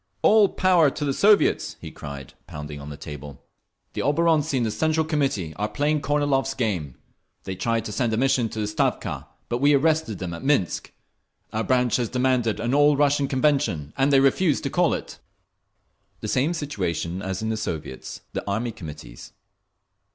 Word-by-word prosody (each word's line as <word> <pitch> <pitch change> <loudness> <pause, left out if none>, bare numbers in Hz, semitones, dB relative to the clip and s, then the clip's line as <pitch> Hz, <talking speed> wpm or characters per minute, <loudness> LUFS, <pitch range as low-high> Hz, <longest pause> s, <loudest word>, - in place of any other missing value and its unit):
"All 210 -2 +6
power 180 -5 +4
to 150 - -4
the 140 - 0
Soviets!" 205 +7 +3
he - - -8
cried, 70 -3 -9
pounding 75 -3 -7
on 70 - -8
the 75 - -8
table. 75 -3 -9 0.5
"The - - -2
oborontsi 155 0 +2
in 125 - +1
the 110 - 0
Central 160 +6 +1
Committee 135 - -1
are 105 +2 -1
playing 150 +1 0
Kornilov's 140 -2 +1
game. 90 - -2 0.5
They 95 - -5
tried 115 +4 -1
to 105 - -4
send 120 +1 0
a 110 - 0
mission 125 -2 +2
to 110 - -6
the - - 0
Stavka, 105 +1 -1 0.2
but 120 - -2
we 145 +2 +5
arrested 155 - +1
them 90 -2 -5
at 85 - -8
Minsk…. 135 - 0 0.6
Our 110 +1 0
branch 125 -2 +2
has 120 -3 -1
demanded 125 -3 +1
an 120 +2 -1
All 145 0 +5
Russian 145 -1 +2
Convention, 130 - 0
and 135 +1 +2
they 135 - +6
refuse 145 +3 +3
to - - -3
call - - +2
it…." - - -8 1.0
The - - -4
same 140 +10 +1
situation 95 - -3
as 95 +2 -4
in 110 - -1
the 110 - 0
Soviets, 80 -11 -5
the - - -3
Army 115 +4 -1
Committees. 75 - -10
125 Hz, 180 wpm, -24 LUFS, 95-145 Hz, 1.0 s, All